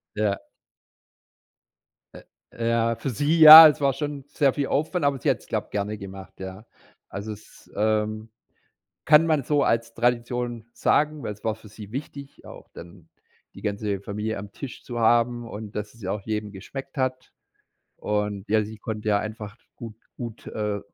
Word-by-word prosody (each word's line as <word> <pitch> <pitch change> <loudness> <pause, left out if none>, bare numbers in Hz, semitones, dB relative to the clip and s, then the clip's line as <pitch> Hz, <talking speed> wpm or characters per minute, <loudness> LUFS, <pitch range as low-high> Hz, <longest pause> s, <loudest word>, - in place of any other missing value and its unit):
Ja. 105 -2 -1 1.7
Äh, 115 0 -9
ja 115 0 +1
für 115 +4 -4
sie 145 +7 0
ja, 155 +1 +13
es 150 - 0
war 140 -1 +2
schon 145 0 -5
sehr 140 -2 +1
viel 145 -2 -2
Aufwand, 155 +3 -1
aber 140 -1 +1
sie - - 0
hat - - +1
es, - - -19
glaube, - - -3
gerne 105 +1 -3
gemacht, 95 -1 -11
ja. 95 +3 -8 0.4
Also, 100 +3 -6
es 105 - -17
ähm, 110 +1 -1 0.8
kann 150 +1 +6
man 155 -4 +1
so 145 +1 +1
als 115 0 0
Tradition 120 -1 -1
sagen, 150 -1 +1
weil 105 - -4
es 105 - -20
war 110 -1 -1
für 110 -1 -16
sie 105 0 -11
wichtig, 140 +1 -8
auch - - -12
dann 85 0 -13 0.4
die - - -12
ganze 100 -1 -3
Familie 105 +2 -4
am 100 0 -9
Tisch 135 +1 -9
zu 120 -1 -6
haben 120 +1 +2
und 105 0 -8
dass 105 0 -5
es 115 - -19
ja 95 -1 -3
auch 105 - -3
jedem 105 0 -4
geschmeckt 135 +9 -9
hat. 130 -1 -2 0.7
Und 105 -1 -2
ja, 110 0 +3
sie 110 +1 -9
konnte 110 0 -4
ja 100 -1 +3
einfach 110 0 -7 0.2
gut 115 -3 -9 0.2
gut, 115 -3 -8
äh, 105 -1 -3
110 Hz, 175 wpm, -24 LUFS, 105-130 Hz, 1.7 s, ja